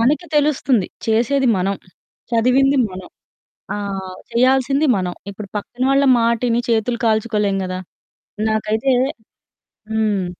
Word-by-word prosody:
మనకి 295 +9 +2
తెలుస్తుంది, 275 -8 +2 0.2
చేసేది 245 +4 +2
మనం, 195 +2 0
హ్మ్, 180 - -23 0.4
చదివింది 260 +4 +3
మనం, 185 -1 -9 0.7
ఆహ్, 195 -2 -5 0.2
చెయ్యాల్సింది 265 +4 +3
మనం. 180 -2 -3 0.2
ఇప్పుడు 200 -1 -9
పక్కన 240 +4 -5
వాళ్ళ 275 +1 +3
మాటిని 235 +1 +1
చేతులు 235 +1 +1
కాల్చుకోలేం 210 -3 +1
గదా! 185 0 -4 0.7
నాకైతే 220 +4 0 1.0
హ్మ్. 215 -3 +1
225 Hz, 110 wpm, -19 LUFS, 200-255 Hz, 1.0 s, చదివింది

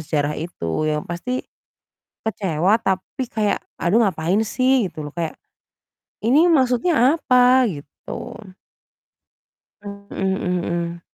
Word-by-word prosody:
sejarah 150 -1 -1
itu, 155 - -3
yang 150 0 -1
pasti 235 +10 -4 0.8
kecewa, 195 -1 +1
tapi 195 +5 -2
kayak, 215 -3 0 0.2
"Aduh 185 +6 +3
ngapain 175 +1 0
sih?" 255 0 +2
gitu 155 -3 -7
loh 145 - -6
kayak, 165 +1 -4 0.8
"Ini 290 +10 +4
maksudnya 265 0 +3
apa?" 255 -4 +4
gitu. 145 -3 -8 1.5
Mhm 200 0 -9
mhm 190 -1 -1
mhm. 170 0 -3
190 Hz, 110 wpm, -21 LUFS, 165-250 Hz, 1.5 s, Ini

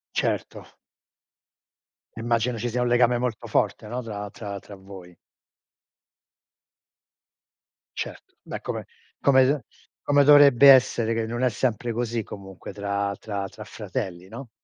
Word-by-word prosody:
Certo. - - -2 1.5
Immagino 115 +1 0
ci 120 +2 -3
sia 125 +1 -1
un 125 - +1
legame 120 0 +3
molto 120 -3 -3
forte, 105 - -1
no, 125 +2 -3
tra 105 -3 -6
tra 100 -1 -7
tra 100 - -12
voi. 95 -2 -13 2.8
Certo. - - -7
Beh, - - -7
come - - -5 0.4
come 130 -2 +5 0.2
s - - -28 0.2
come 145 0 +4
dovrebbe 140 -2 +8
essere 120 -4 +5
che 115 - -1
non 120 +2 -4
è 130 - +4
sempre 120 0 -2
così 115 0 -2
comunque 95 -2 -10
tra 100 0 -2
tra 100 -3 -4
tra - - -11
fratelli, 90 0 -6
no? 115 +5 -9
115 Hz, 130 wpm, -25 LUFS, 100-125 Hz, 2.8 s, dovrebbe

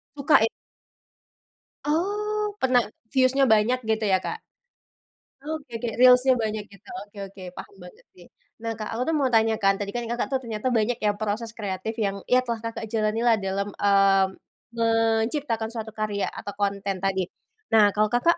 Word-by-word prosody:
Suka, 280 +2 +3
e - - +4 1.4
Oh, 415 +6 -1
pernah 250 -2 +3 0.2
views-nya 265 0 +3
banyak 225 +4 +3
gitu 220 0 +1
ya, 190 -2 +2
Kak? 445 - -5 1.0
Oke 300 -4 -6
oke 240 - -1
Reels-nya 255 +1 +7
banyak 215 -2 -2
gitu. 200 - -17
Oke 205 0 -14
oke, 195 -1 -12
paham - - -9
banget. 180 0 -14 0.6
Nah 225 -1 -3
Kak, 215 0 -5
aku 250 +7 -1
mau 275 - +1
tanya 220 0 +3
kan, 195 0 +3
tadi 200 - -3
kan 240 +2 -3
Kakak 240 +3 -1
ternyata 235 0 -3
banyak 230 0 0
yang 205 -1 +1
proses 215 +2 -2
kreatif 205 +2 -4
yang 200 -2 -1
ya 255 0 +4
telah 230 -2 -3
Kakak 230 -1 -5
jalani 220 +1 -1
lah 230 -2 +6
dalam, 195 +1 -2
eee, 195 -1 +4 0.5
menciptakan 225 +1 +1
suatu 220 -1 -5
karya, 210 -2 -1
atau 205 - -7
konten 200 -1 -1
tadi. 190 -2 0 0.5
Nah 210 -2 +7
kalau 210 +1 +2
Kakak, 335 +8 +3
225 Hz, 160 wpm, -25 LUFS, 205-250 Hz, 1.4 s, Reels-nya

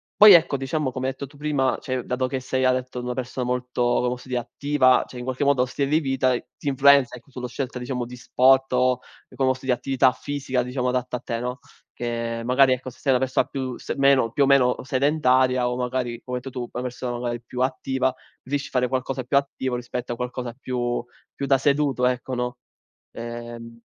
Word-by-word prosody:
poi 210 -1 +10
ecco, 165 -4 +5
diciamo 135 +1 -2
come 130 +1 -3
hai - - +1
detto 140 - -6
tu 145 - -20
prima, 145 -3 0
cioè 130 -1 -3
dato 130 +1 -1
che 130 0 -3
sei 130 0 -1
hai 130 - +5
detto 125 -1 -4
una 125 0 -3
persona 125 0 -4
molto 125 0 -2
come 120 0 +2
posso 125 +1 -6
dire 125 -1 -1
attiva, 130 +1 +2
cioè 125 - -11
in 125 - -5
qualche 130 +2 -2
modo 140 -2 +3
lo 125 - +3
stile 140 +2 -2
di 155 +2 +3
vita, 135 -3 +1 0.2
ti - - -8
influenza 140 -2 +5
ecco, 135 +3 -15
sulla 125 -1 -5
scelta 125 0 -4
diciamo 125 0 -3
di 125 +1 -9
sport 130 +2 +3
o 125 0 +3 0.4
come 135 -1 +2
posso 130 0 -2
di 130 - +2
attività 130 +1 +2
fisica 130 +1 -2
diciamo 125 0 -2
adatta 125 0 -1
a - - -10
te, 115 -2 -3
no, 125 +2 -3 0.4
che 115 -1 -3
magari 130 +1 +5
ecco, 130 +1 -4
se - - -20
sei 135 - +1
una 125 - +3
persona 130 0 +1
più 130 -2 -4
s - - -4
meno 135 -4 +4
più 140 - +2
o - - +5
meno 130 -3 +4
sedentaria 130 -2 +2
o 125 - -2
magari 125 -1 -2
come 125 -1 -3
detto 130 +1 -8
tu, 120 -2 -5
una 125 - -4
persona 125 -1 -4
magari 120 -1 -3
più 125 +1 -6
attiva, 130 0 0 0.3
riesci 145 +2 -2
a - - -16
fare 125 -1 +2
qualcosa 130 0 -2
più 140 +3 +2
attivo 130 -2 -1
rispetto 120 0 -4
a - - -5
qualcosa 125 0 -4
più 120 -1 -2 0.3
più 140 - -4
da 135 0 +5
seduto, 140 -2 +1
ecco, 125 +1 -1
no? 125 0 -3 0.6
Ehm. 115 0 -8
130 Hz, 220 wpm, -24 LUFS, 125-135 Hz, 0.6 s, poi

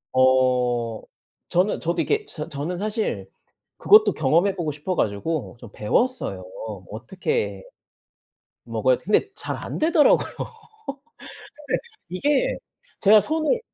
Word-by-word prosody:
어 125 -3 +2 0.5
저는 185 +4 +2
저도 170 +1 0
이렇게 430 0 0
저 155 - -6
저는 155 +4 -4
사실 215 +3 -2 0.5
그것도 425 +1 +6
경험해 165 +7 +2
보고 165 -5 -2
싶어 150 +6 -3
가지고 120 +6 -2
좀 115 -4 -12
배웠어요. 250 - 0 0.5
어떻게 460 0 -3 1.0
먹어야 - - +1
근데 405 - +1
잘 - - -4
안되더라고요. 315 -1 +3
근데 - - -7 1.6
이게 270 +11 +1 0.4
제가 210 +1 +7
손을, 320 - 0
180 Hz, 235 characters per minute, -23 LUFS, -, 1.6 s, 제가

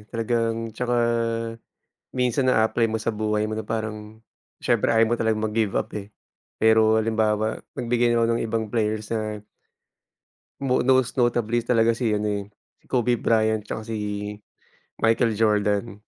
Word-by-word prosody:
talagang 115 -1 -1
tsaka 120 +2 -1 1.2
minsan 125 +1 +1
naa-apply 115 -1 +3
mo 110 - -2
sa 115 - -1
buhay 105 0 -1
mo 110 - -3
na 110 - -6
parang, 110 0 -5 0.4
siyempre - - +2
ayaw 115 0 +4
mo 120 - +2
talagang 110 -1 0
mag-give 110 -1 0
up, - - 0
eh. 105 +1 -9 0.5
Pero 110 0 +5
halimbawa, 110 -1 +1 0.2
magbigay 120 -1 +1
na 115 0 +3
ako 115 - +2
ng - - -2
ibang 110 0 -1
players 110 -2 -1
na 110 -2 -3 1.2
mo 130 -2 +1
most 130 -1 +3
notably 120 -2 +1
talaga 115 -1 +3
si 115 -2 -1
ano 105 0 0
eh, 105 -1 -1 0.4
si - - -37
Kobe 125 -1 +2
Bryant 110 -2 +1
tsaka 110 +1 -6
si 115 - -4 1.1
Michael 115 0 +3
Jordan. 105 0 +1
110 Hz, 150 wpm, -24 LUFS, 110-115 Hz, 1.2 s, Pero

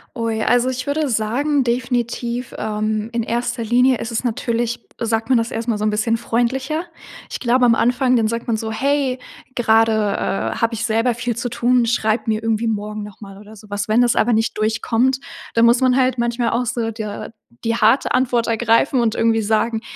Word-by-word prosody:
Ui, 230 -2 -2
also, 245 +2 +2
ich 255 +1 -4
würde 295 0 0
sagen, 260 +6 +1
definitiv, 240 0 -2
ähm, 215 0 -2
in 235 - 0
erster 235 +1 -2
Linie 245 +2 +3
ist 230 - -5
es 230 - -2
natürlich 235 0 -2 0.2
sagt 225 0 -1
man 255 - +5
das 230 0 -1
erstmal 225 -1 -2
so 210 - -4
'n 215 - +2
bisschen 220 +2 0
freundlicher. 260 +7 -1 0.5
Ich - - -5
glaube 250 +1 +3
am 230 - +5
Anfang, 250 +2 +2
dann 225 -2 +2
sagt 230 +1 -4
man 230 -2 +1
so: 220 0 -4
„Hey, 270 +2 0 0.3
gerade, 225 -2 +3
äh, 210 -2 -1
habe 230 0 0
ich 225 0 -2
selber 230 +2 +1
viel 240 0 -3
zu 245 - -2
tun. 240 0 +2
Schreib 225 0 0
mir 215 0 0
irgendwie 225 0 0
morgen 210 -1 -3
nochmal 200 -1 -11
oder 210 +1 -13
sowas.“ 205 -1 -5
Wenn 220 +3 +3
das 240 -1 +3
aber 240 - +2
nicht 225 +1 0
durchkommt, 225 +4 +1 0.3
dann 230 0 +4
muss 235 +2 +4
man 255 -1 +3
halt 255 -1 +2
manchmal 235 0 0
auch 245 +1 0
so 235 -1 -2
der 215 -1 -6 0.3
die 230 0 0
harte 230 +3 +3
Antwort 245 -2 +1
ergreifen 230 +4 +2
und 230 -2 +1
irgendwie 225 -1 +1
sagen: 220 +1 0
230 Hz, 195 wpm, -20 LUFS, 220-245 Hz, 0.5 s, man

